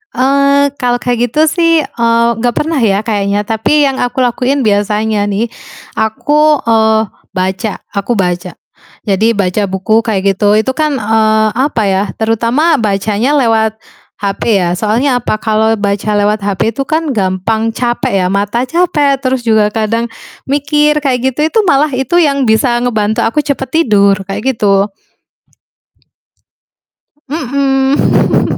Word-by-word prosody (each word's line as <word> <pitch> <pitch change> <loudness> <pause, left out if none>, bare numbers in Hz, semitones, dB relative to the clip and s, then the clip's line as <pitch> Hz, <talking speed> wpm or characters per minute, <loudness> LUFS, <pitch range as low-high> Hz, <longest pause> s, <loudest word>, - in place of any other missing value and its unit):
Eee, 280 +2 +2
kalau 245 -1 +1
kayak 245 -1 0
gitu 300 +7 0
sih, 335 -1 +2
eee, 235 -2 +1
gak 240 0 -1
pernah 315 -1 -1
ya 210 -3 +1
kayaknya, 205 -2 -1
tapi 225 +7 +1
yang 270 -2 0
aku 245 +1 -1
lakuin 255 +3 0
biasanya 210 0 0
nih, 215 +3 -2 0.5
aku, 295 +7 +1
eee, 220 -1 +3 0.3
baca, 190 +2 -2 0.2
aku 200 +4 -2
baca. 180 -2 -2 0.5
Jadi 215 +3 +1
baca 200 +1 0
buku 190 +4 +1
kayak 205 -4 -1
gitu, 205 +1 +2
itu 260 - -1
kan, 305 -2 0
eee, 220 0 +2
apa 260 -3 0
ya, 190 0 +1 0.2
terutama 235 +8 +1
bacanya 215 +5 0
lewat 225 -4 +1 0.4
HP 200 +1 -1
ya, 175 - 0
soalnya 245 +5 +1
apa? 215 - -1
Kalau 220 0 +1
baca 200 +1 -2
lewat 210 +1 +1
HP 205 +2 -1
itu 275 - -4
kan 315 -3 -1
gampang 210 +3 -1
capek 240 -6 -1
ya, - - +1
mata 205 +5 -1
capek, 295 -3 +1
terus 260 -2 -1
juga 220 -2 +3
kadang 230 +1 -1 0.4
mikir 295 +2 +1
kayak 260 -3 +1 0.2
gitu, - - -8
itu 450 - +2
malah 295 -1 +2
itu 265 +7 -1
yang 280 -5 +1
bisa 240 +2 +2
ngebantu 220 -3 0
aku 295 +6 0
cepet 270 -3 -2
tidur 200 -5 +3
kayak 240 +7 -2
gitu. 200 -1 +2 2.4
Mhm. 275 -1 +1
225 Hz, 140 wpm, -12 LUFS, 210-270 Hz, 2.4 s, eee